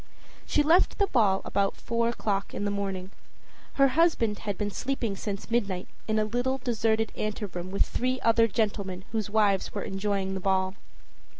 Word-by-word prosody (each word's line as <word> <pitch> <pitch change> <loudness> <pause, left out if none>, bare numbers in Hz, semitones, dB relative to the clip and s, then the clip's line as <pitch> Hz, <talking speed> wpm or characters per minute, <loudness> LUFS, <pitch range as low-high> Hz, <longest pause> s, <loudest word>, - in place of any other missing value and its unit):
She 295 - +3
left 330 +5 +4
the 405 - +3
ball 210 - +2
about 200 0 0
four 230 0 0
o'clock 200 -4 -2
in 205 - -2
the 205 - 0
morning. 195 -2 -3 0.6
Her 275 -1 +5
husband 255 -9 +2
had 205 -3 -3
been 205 -1 -2
sleeping 240 -3 -2
since 200 +2 -5
midnight 200 -6 0 0.2
in 220 0 +1
a 215 - +2
little 245 +4 0
deserted 225 -3 0
anteroom 200 -4 -4
with 200 +1 +2
three 255 +1 -1
other 230 0 +4
gentlemen 200 -4 -2
whose 220 -3 -2
wives 205 -3 +2
were 200 - -2
enjoying 195 -1 -1
the 190 - -3
ball. 190 0 +1
210 Hz, 170 wpm, -28 LUFS, 195-235 Hz, 0.6 s, Her